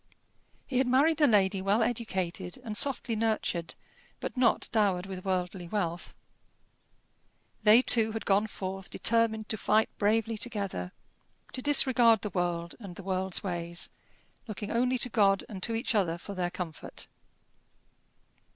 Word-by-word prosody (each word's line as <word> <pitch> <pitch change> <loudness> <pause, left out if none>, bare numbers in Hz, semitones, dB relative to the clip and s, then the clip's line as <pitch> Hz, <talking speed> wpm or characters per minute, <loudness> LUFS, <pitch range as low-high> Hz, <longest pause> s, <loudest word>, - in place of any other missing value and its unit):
He 255 -2 -1
had 260 - +2
married 290 +5 +3
a 295 - +7
lady 195 -3 +2
well 200 +4 +2
educated 190 -6 -3
and 215 -2 -5
softly 250 -1 +3
nurtured, 215 -6 -1 0.4
but - - -5
not 250 -3 +2
dowered 200 -5 +1
with 190 -1 -7
worldly 180 -1 -2
wealth. 175 -3 -3 1.5
They 220 +3 +6
two 225 -3 +4
had 225 - -5
gone 205 +2 +2
forth 195 -1 -6
determined 225 -1 +1
to 220 - 0
fight 215 +2 +2
bravely 220 +1 +1
together; 200 - -4 0.6
to 255 - -3
disregard 250 -6 +5
the 210 - -3
world 175 -2 -2
and 195 -6 -9
the 195 - -10
world's 190 -1 0
ways, 170 -2 -3 0.6
looking 210 -1 -5
only 250 +2 +1
to 250 - 0
God 200 -3 +3
and 195 -3 -8
to 225 +4 -1
each 230 +2 -1
other 180 -6 +1
for 200 +3 -8
their 180 -2 -2
comfort. 170 -5 -6
205 Hz, 145 wpm, -29 LUFS, 185-230 Hz, 1.5 s, a